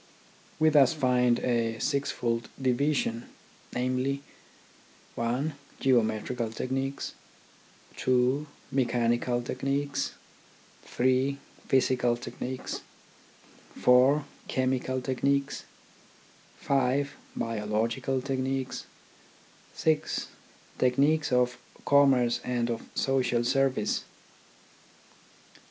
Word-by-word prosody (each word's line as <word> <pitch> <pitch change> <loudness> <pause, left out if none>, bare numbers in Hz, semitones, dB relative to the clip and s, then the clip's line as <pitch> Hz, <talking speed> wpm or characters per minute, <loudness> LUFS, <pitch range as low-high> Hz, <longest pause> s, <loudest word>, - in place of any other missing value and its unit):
We 155 0 +5
thus 145 -2 +5
find 125 -4 +3
a 115 -2 0
sixfold 120 -4 -1
division, 130 -2 0 0.5
namely, 130 +3 0 0.9
(1) 125 +7 -1 0.3
Geometrical 115 -1 +1
techniques, 135 +4 -3 0.8
(2) 130 +4 +2 0.2
Mechanical 120 -1 +1
tech 125 - -5
niques, 140 +1 -1 0.7
(3) 130 +2 +1 0.3
Physical 125 -2 +2
techniques, 125 +1 -5 0.9
(4) 130 +4 +5 0.2
Chemical 130 0 0
techniques, 140 +2 0 0.9
(5) 140 +1 +1 0.2
Biological 115 +4 -1
techniques, 130 -1 -2 0.9
(6) 155 -1 0 0.5
Tech 125 -1 +3
niques 145 +2 +2
of 125 -1 +2 0.3
commerce 135 -4 +4
and 120 -1 -1
of 115 - -3
social 125 -3 +1
service. 130 -3 +1
130 Hz, 75 wpm, -28 LUFS, 120-135 Hz, 0.9 s, We